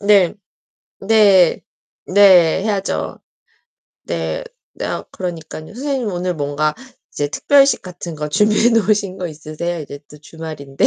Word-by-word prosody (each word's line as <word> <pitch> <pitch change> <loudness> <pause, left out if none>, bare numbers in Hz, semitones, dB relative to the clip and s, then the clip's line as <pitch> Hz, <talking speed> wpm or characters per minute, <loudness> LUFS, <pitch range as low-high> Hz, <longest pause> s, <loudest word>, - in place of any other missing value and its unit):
네. 200 -3 +4 0.7
네. 195 -4 +4 0.4
네, 185 -3 +5
해야죠. 200 -2 -2 0.9
네. - - -3 0.3
내가 - - -4
그러니깐요. 165 -1 -7
선생님 265 -3 -2
오늘 180 -1 -2
뭔가 150 0 -1 0.4
이제 145 0 -2
특별식 275 - +3
같은 175 -2 -8
거 150 0 -4
준비해 210 +7 +3
놓으신 210 -4 +1
거 180 - -3
있으세요? 160 +2 -5
이제 145 -1 -8
또 150 - -13
주말인데. 150 -3 -5
180 Hz, 260 characters per minute, -18 LUFS, 155-210 Hz, 0.9 s, 네